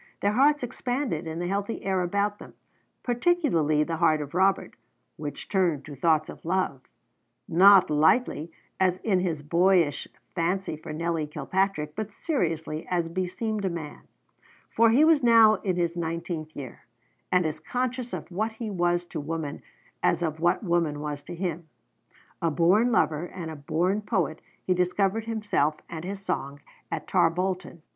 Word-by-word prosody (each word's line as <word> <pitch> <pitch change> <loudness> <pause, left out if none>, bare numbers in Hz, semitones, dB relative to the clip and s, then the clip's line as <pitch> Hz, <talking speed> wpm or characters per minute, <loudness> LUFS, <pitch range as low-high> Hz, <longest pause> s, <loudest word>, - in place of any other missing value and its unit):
Their 200 - +2
hearts 285 +5 +3
expanded 245 - -2
in 160 0 -4
the 175 - -2
healthy 200 +4 -3
air 190 -1 +1
about 200 +3 0
them, - - -12 0.5
particularly 240 - +2
the 165 +1 -3
heart 155 -1 +3
of 145 -1 -6
Robert, 190 +2 +2 0.4
which 150 -1 -7
turned 175 -8 +1
to 145 - -8
thoughts 155 +2 +2
of - - -10
love, 170 -6 -1 0.7
not 190 +1 +6
lightly, 160 - +2 0.3
as 185 -1 +2
in 195 -5 +2
his 165 -5 -2
boyish 170 -1 +2 0.3
fancy 180 0 -1
for 155 - -9
Nelly 165 0 -2
Kilpatrick, 170 -1 -1
but 215 0 -4
seriously, 165 - -2
as 175 -2 0
beseemed 195 +5 -2
a 190 - +1
man; 160 -4 -6 0.7
for 230 0 +5
he 265 +7 +5
was 320 -2 +5
now 225 -3 +6
in 185 -1 -2
his 170 -1 0
nineteenth 165 -1 -4
year, 130 -5 -9 0.4
and 180 -1 +3
as 155 0 -2
conscious 250 0 -3
of - - -6
what 215 +5 -1
he 220 -1 -5
was 175 -1 +1
to 175 - -6
woman 155 -1 -4 0.4
as - - +2
of 160 -1 -2
what 175 +6 +2
woman 170 -5 0
was 145 -1 -4
to 145 - -8
him. 170 -2 -4 0.7
A 165 - +2
born 185 +10 +3
lover, 160 -5 +1
and 170 -3 -7
a - - -7
born 170 +8 0
poet, 190 -7 -1 0.2
he 185 - +3
discovered 195 +4 +1
himself 210 -9 0
and 165 -1 -7
his 195 +1 -6
song 140 +1 -3 0.3
at - - -4
Tarbolton. 180 -1 0
175 Hz, 160 wpm, -26 LUFS, 160-205 Hz, 0.7 s, not